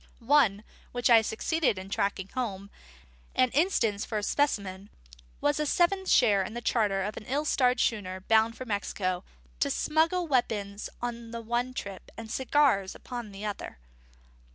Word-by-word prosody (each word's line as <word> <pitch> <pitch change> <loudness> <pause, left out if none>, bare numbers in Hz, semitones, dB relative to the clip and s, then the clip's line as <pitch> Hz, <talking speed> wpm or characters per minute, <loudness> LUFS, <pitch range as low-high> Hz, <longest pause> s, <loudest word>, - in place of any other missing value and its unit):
One, 215 -9 +4 0.3
which 245 0 +1
I 230 -1 +8
succeeded 240 - 0
in 185 0 -7
tracking 195 -1 -1
home, 200 -6 -4 0.6
and 255 -1 +3
instance 240 - +2
for 220 - -3
a 210 - -2
specimen, 200 -7 -1 0.5
was 290 0 +1
a 300 - +1
seventh 380 +4 +2
share 210 -6 +5
in 205 +4 -5
the - - -2
charter 210 -5 +1
of 210 +2 -4
a - - -5
certain 215 - -11
ill 290 +3 0
starred 250 -4 +2
schooner 190 -6 -1
bound 225 +3 +3
for 255 - -6
Mexico, 195 -4 -2 0.4
to - - +2
smuggle 330 +3 +1
weapons 210 -7 -1
on 235 -1 -4
the 230 0 -6
one 240 +3 -2
trip, 195 -5 -7
and 225 -1 -7
cigars 260 -8 +2
upon 240 -4 -7
the 200 +2 -7
other. 205 - -5
225 Hz, 165 wpm, -28 LUFS, 200-255 Hz, 0.6 s, I